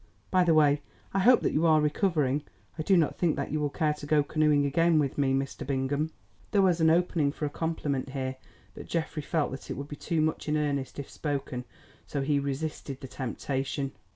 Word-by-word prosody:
By 185 -1 +5
the 165 -2 +4
way 145 -1 +4 0.3
I 195 - +2
hope 240 +6 +6
that - - 0
you 165 +3 +3
are 155 -1 +5
recovering. 150 -3 +1 0.3
I 160 - -4
do 190 +4 +4
not 160 -3 +1
think 170 -4 +2
that 140 - -3
you 155 - 0
will 145 -1 0
care 150 +1 0
to 150 -1 -9
go 150 -1 +4
canoeing 150 -1 +2
again 165 +3 +3
with 140 -3 +1
me, 140 -2 +1
Mr. 135 0 -2
Bingham." 140 +3 -1 0.4
There 200 -2 +3
was 175 -3 +3
an 160 - +5
opening 165 -3 +2
for 150 - -4
a 145 - -3
compliment 145 -5 -2
here, 130 -1 -3 0.4
but - - -10
Geoffrey 160 -2 -2
felt 155 +1 -1
that 135 - -8
it - - -4
would 140 +1 -5
be 145 - -6
too 165 +2 -2
much 155 0 0
in 155 - +2
earnest 140 -3 -2
if 140 - -5
spoken, 135 -4 -4 0.4
so 140 - -2
he 145 0 +2
resisted 140 -1 -4
the 135 - -8
temptation. 135 +2 -3
150 Hz, 215 wpm, -28 LUFS, 140-160 Hz, 0.4 s, hope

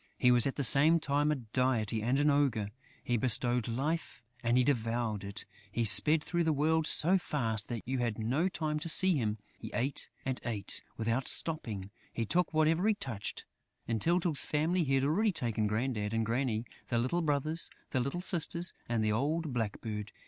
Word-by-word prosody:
He 125 - +4
was 120 +1 +5
at 135 - -3
the 140 - -2
same 155 +6 +6
time 145 0 0
a - - +1
deity 115 -3 -1
and 125 +5 0
an 145 0 +3
ogre; 130 -8 +1 0.3
he 120 - 0
bestowed 120 0 +2
life 135 +3 -3 0.2
and 120 +1 +1
he 125 - +4
devoured 115 -5 -1
it; 100 +1 -7 0.3
he 115 +3 -1
sped 150 +8 +7
through 175 -1 -1
the 160 - +1
world 155 +2 +1
so 185 +5 +3
fast 115 - -3
that 115 -2 -6
you 130 0 -2
had 120 -3 -2
no 130 +12 0
time 155 -3 -3
to 165 +2 -4
see 185 +3 +5
him; 110 -4 -2 0.2
he - - -8
ate 130 +3 -2 0.2
and 130 -1 -3
ate, 105 -4 -5
without 115 +3 -1
stopping; 110 - -1 0.2
he 115 - -3
took 180 +8 0
whatever 160 +5 +2
he 220 - +3
touched. 120 - -6 0.4
In 115 -1 -1
Tyltyl's 170 - +3
family, 165 +4 0
he 135 -2 0
had 135 - +1
already 200 +10 +1
taken 115 - -1
Grandad 110 -1 -2
and 115 0 0
Granny, 115 -1 -1 0.2
the 120 - -1
little 130 +9 0
brothers, 155 +1 -1 0.2
the 130 - 0
little 140 +8 -3
sisters 175 -1 +1 0.2
and 115 -2 0
the 110 - +1
old 150 +6 -1
blackbird! 110 -2 -4
130 Hz, 190 wpm, -31 LUFS, 115-155 Hz, 0.4 s, sped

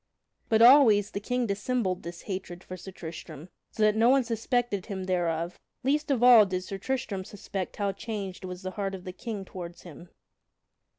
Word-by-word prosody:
But 225 0 +5
always 235 -6 +7
the - - -3
King 245 +4 -1
dissembled 200 -2 -1
this 170 0 -8
hatred 185 -2 -6
for 185 - -8
Sir 185 +2 -10
Tristram, 160 -2 -9 0.2
so 220 - -2
that 215 0 +4
no 225 +2 +4
one 270 0 +5
suspected 230 -3 -1
him 195 -3 -4
thereof; 175 -2 -1 0.2
least 295 +4 +1
of 255 -4 +1
all 245 -3 +9
did 185 -1 -2
Sir 195 +1 -6
Tristram 215 -5 -3
suspect 195 -1 -6
how 200 -1 0
changed 200 -2 -6
was 180 0 -7
the 185 - -4
heart 195 0 -3
of 185 - -10
the 185 -1 -7
King 205 -1 -6
toward 175 -2 -8
him. 170 0 -12
195 Hz, 185 wpm, -28 LUFS, 185-230 Hz, 0.2 s, all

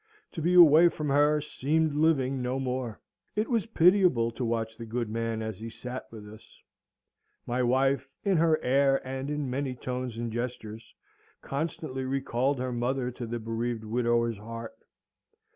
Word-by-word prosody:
To 165 - -5
be 175 +3 +2
away 170 0 +8
from 150 -2 -4
her 145 +2 +4
seemed 150 +2 0
living 140 -4 +2
no 125 +2 -1
more. 125 -3 -3 0.4
It 215 +2 0
was 230 -2 +1
pitiable 180 - +4
to 120 +3 -5
watch 115 -1 -2
the 115 - -7
good 120 +1 -2
man 115 0 -2
as 110 -3 -5
he 115 +1 -6
sate 125 +3 -6
with 105 -2 -11
us. 110 +1 -15 0.9
My 125 +1 -1
wife, 135 +2 +1
in 195 -3 +2
her 160 -1 +3
air 135 +1 +3
and 135 +1 -4
in 150 -1 -2
many 130 0 -2
tones 125 -1 -4
and 115 -1 -3
gestures, 115 -2 -6 0.5
constantly 140 -2 -3
recalled 135 0 0
her 125 0 -3
mother 125 +1 -1
to 120 -1 -7
the 120 +1 -3
bereaved 115 0 -3
widower's 115 0 0
heart. 115 +1 -7
130 Hz, 160 wpm, -28 LUFS, 115-145 Hz, 0.9 s, away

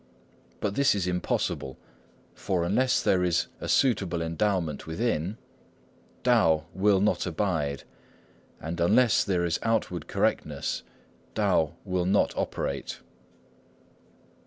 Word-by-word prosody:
But 105 -2 -1
this 140 0 +3
is 95 -3 -1
impossible. 90 -6 -2 0.6
For 90 -3 -1
unless 125 +8 +2
there 90 -1 +3
is 85 -2 +2
a - - -5
suitable 95 -10 +2
endowment 85 -1 -1
within, 95 +1 -1 0.9
Tao 85 -11 +3
will 95 +1 +3
not 105 -1 +1
abide; 80 -6 -1 0.8
and 85 +2 -5
unless 110 +7 +4
there 90 -4 0
is 85 0 0
outward 110 -7 -1
correctness, - - -1 0.5
Tao - - +2
will 90 -1 -1
not 100 +2 +2
operate." - - -3
90 Hz, 110 wpm, -27 LUFS, 85-105 Hz, 0.9 s, unless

